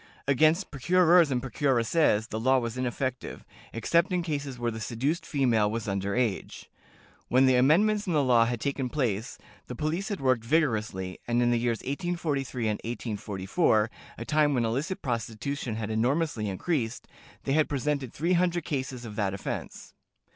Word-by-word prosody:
Against 155 +7 +3
procurers 175 +3 +4
and 125 -2 -1
procuresses 125 -2 +1
the 110 - -3
law 130 +3 +3
was 120 -2 -2
ineffective, 130 0 -3 0.3
except 170 - +1
in 180 -1 0
cases 145 -5 -4
where 120 -1 -1
the 110 - -6
seduced 140 +10 -2
female 120 -7 +2
was 115 0 -4
under 100 0 -2
age. 120 -6 -2 0.6
When 130 +2 +4
the 130 -1 +4
amendments 200 +11 +3
in 175 - 0
the 150 -2 +3
law 120 -3 +4
had 120 0 -2
taken 135 0 -2
place, 120 -6 -2 0.3
the 125 - -6
police 160 - -2
had 205 - -3
worked 130 -4 +1
vigorously, 110 - 0
and 120 0 +1
in 120 0 +3
the 120 - +2
years 115 -1 -1
1843 140 -5 -2
and 105 -1 0
1844, 110 - 0 0.3
a 115 - -6
time 150 -1 +2
when 120 -2 +1
illicit 150 - -2
prostitution 120 +1 -3
had 110 -1 -4
enormously 120 0 0
increased, 120 - -2 0.4
they 135 - -1
had 155 0 +2
presented 140 -2 -1
three 170 +5 0
hundred 175 -1 +1
cases 130 -5 -4
of 105 -2 -8
that 100 -3 0
offense. 95 - -6
130 Hz, 165 wpm, -28 LUFS, 115-155 Hz, 0.6 s, procurers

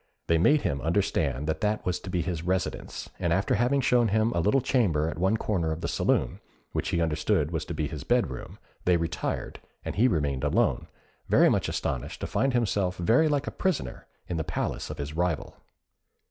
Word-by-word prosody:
They 85 -1 +3
made 145 - +4
him 70 -8 -1
understand 80 -5 0
that 80 +6 -2
that 105 0 0
was 90 - 0
to - - -8
be 90 -2 0
his 85 -3 -3
residence, 90 +1 -3
and 85 - 0
after 95 +4 +2
having 130 +3 +2
shown 120 -2 +3
him 110 +2 +2
a 85 - 0
little 105 +11 +3
chamber 95 - +1
at 80 - -4
one 95 +5 +2
corner 90 -8 -1
of 80 +1 -4
the - - -2
saloon, - - 0 0.3
which - - -2
he 85 - 0
understood 75 -1 +1
was 80 -2 -2
to 85 - -5
be 75 -1 -1
his 75 -1 -6
bed 120 - +2
room, 65 - -8 0.3
they 90 -1 +4
retired, 85 -1 -3 0.3
and - - -3
he 120 +5 +5
remained 70 - 0
alone, 75 - +1 0.4
very - - +6
much - - +1
astonished 65 -3 -3
to - - -1
find 135 -1 0
himself 100 -6 +1
something 85 - -5
very 125 - +5
like 145 -1 0
a - - -4
prisoner 190 -5 -2 0.2
in 85 - -3
the 80 - -1
palace - - -3
of - - -6
his 70 +1 -5
rival. 85 -2 -1
85 Hz, 210 wpm, -27 LUFS, 80-110 Hz, 0.4 s, very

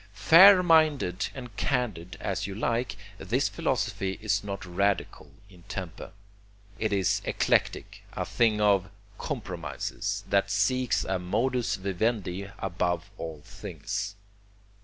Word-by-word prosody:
Fair 180 - +8
minded 155 - +3
and 125 -5 -9
candid 110 - -2
as 100 0 -2
you 100 - -6
like, 120 +3 -1 0.2
this 95 - 0
philosophy 95 -1 -2
is 105 -1 0
not 100 -1 -5
radical 100 +2 -1 0.2
in 90 -3 -17
temper. 90 -4 -6 0.7
It 110 -1 0
is 95 -3 +1
eclectic, - - 0
a - - -3
thing 110 -3 +2
of 100 -3 +3 0.3
compromises, 95 - -4
that 100 0 +2
seeks 115 +5 +1
a 95 -1 -1
modus 120 +7 0
vivendi 95 0 -2
above 90 +1 -2
all 80 -3 -6
things. 100 - -5
100 Hz, 115 wpm, -28 LUFS, 95-120 Hz, 0.7 s, Fair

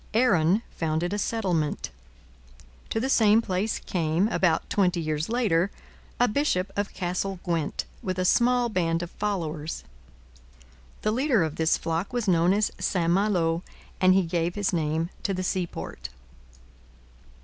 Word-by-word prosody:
Aaron 205 -4 +3
founded 165 +3 -1
a 205 - -1
settlement. 185 -9 -1 1.0
To 225 - -1
the 255 - -1
same 220 -4 +5
place 205 0 -1
came, 170 +2 0
about 175 -7 +1
twenty 185 -3 +1
years 155 +1 -2
later, 200 -7 +2 0.5
a 245 - +5
bishop 210 -7 0
of 205 0 -1
Castle 185 +1 -2
Gwent, 165 -5 -1 0.2
with 185 -1 -3
a 185 - 0
small 245 +4 +3
band 170 -5 0
of 175 - -7
followers. 165 -7 -3 1.2
The 215 - +2
leader 250 - +2
of 160 -1 -3
this 160 0 +2
flock 165 +7 -3
was 240 -3 -1
known 175 -1 +4
as 210 +2 +2
St 170 -3 +1
Malo, 175 -4 +2 0.4
and 185 0 +5
he 190 - +4
gave 170 0 -1
his 205 -2 0
name 160 +1 0
to 195 - -1
the 185 - -2
seaport. 180 -1 -4
185 Hz, 145 wpm, -26 LUFS, 165-210 Hz, 1.2 s, same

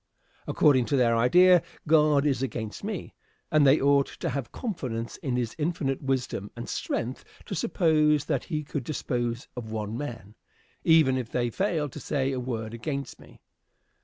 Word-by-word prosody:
According 130 -5 +4
to 140 - 0
their 120 -2 +3
idea, 180 +10 +6 0.3
God 150 -2 +4
is 135 -4 +1
against 110 - -4
me, 205 -3 -5 0.4
and 150 -2 +5
they 135 +3 +6
ought 140 0 +3
to - - -5
have 135 -3 -4
confidence 125 - -4
in 130 -3 -3
this 120 -2 -1
infinite 150 -4 -1
wisdom 130 -7 -2
and 120 - -7
strength 120 +3 -3 0.2
to - - -6
suppose 155 -4 +2
that - - -1
he 155 -4 -3
could 145 -2 -4
dispose 120 -3 -3
of 115 -3 -6
one 110 0 -3
man, 115 -7 -6 0.5
even 155 -6 +5
if 120 -3 -5
they 120 -1 -1
failed 160 - -1
to - - -8
say 135 -2 -1
a 130 - -2
word 115 -3 -4
against 140 +4 -5
me. - - -17
135 Hz, 165 wpm, -27 LUFS, 120-150 Hz, 0.5 s, idea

